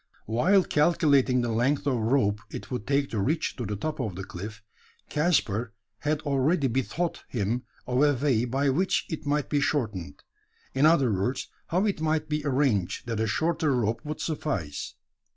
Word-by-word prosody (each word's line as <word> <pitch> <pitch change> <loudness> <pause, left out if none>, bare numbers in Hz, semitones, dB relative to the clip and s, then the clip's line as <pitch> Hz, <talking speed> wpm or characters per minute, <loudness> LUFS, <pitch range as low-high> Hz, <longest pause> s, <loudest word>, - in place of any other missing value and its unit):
While 180 - +3
calculating 145 -6 +3
the 120 -1 -1
length 125 +6 +1
of 140 - +2
rope 110 -3 +1
it - - -8
would 125 -5 -4
take 140 0 +1
to 110 - -1
reach 155 +11 0
to 120 -5 -3
the 105 - -2
top 155 +9 -3
of 110 -8 -2
the 95 - -5
cliff, 105 +2 -8 0.5
Caspar 125 - +1 0.2
had 150 +1 0
already 140 +2 +2
bethought 135 +7 -1
him 120 +2 -1 0.2
of 125 +1 +1
a 145 -1 +5
way 125 -3 +1
by 135 +3 +1
which 185 +8 +1
it 155 -3 -5
might 145 0 +1
be 145 -1 +1
shortened 110 - -2 0.5
in 135 +3 +5
other 140 -9 +4
words, 100 +8 -1 0.2
how 185 +5 +1
it 200 -7 -1
might 155 -1 0
be 150 -1 -1
arranged, 130 -10 +1
that 115 -2 -3
a 110 - +1
shorter 155 +4 +1
rope 115 -1 0
would 150 0 -5
suffice. 135 - -3
135 Hz, 175 wpm, -27 LUFS, 110-150 Hz, 0.5 s, a